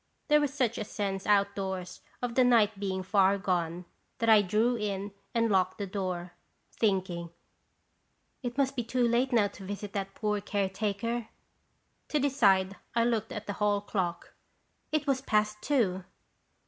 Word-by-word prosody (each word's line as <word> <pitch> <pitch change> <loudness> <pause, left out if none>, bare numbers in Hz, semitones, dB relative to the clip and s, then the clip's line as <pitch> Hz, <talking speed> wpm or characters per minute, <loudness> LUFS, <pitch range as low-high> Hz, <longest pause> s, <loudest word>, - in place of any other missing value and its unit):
There 300 0 +6
was 290 -2 0
such 250 -5 0
a - - -1
sense 200 -2 -3
outdoors 195 -3 0 0.2
of 245 -1 -1
the 255 - +4
night 220 -4 +4
being 190 -2 -2
far 195 0 +3
gone 175 -2 -1 0.3
that 230 -2 +1
I 215 -2 +8
drew 215 +5 +2
in 205 -2 -3 0.2
and 230 -1 +2
locked 185 -1 +2
the 205 - -3
door, 185 -3 -4 0.4
thinking 185 -5 0 1.1
"It 245 0 -4
must 275 -1 +1
be 245 - -1
too 240 +1 +1
late 245 +3 +2
now 225 -4 +4
to 200 - -12
visit 200 +1 -6
that 195 -1 -4
poor 210 -1 -1
care 200 -1 -1
taker." 215 +4 -2 0.8
To 300 - 0
decide 200 -9 +3 0.2
I 230 - +4
looked 230 -2 0
at 210 0 -5
the 205 - -3
hall 205 -1 +3
clock. 185 -4 -3 0.6
It 305 -1 0
was 270 -2 +1
past 215 -4 +1
two! 200 -10 +1
205 Hz, 160 wpm, -29 LUFS, 190-235 Hz, 1.1 s, I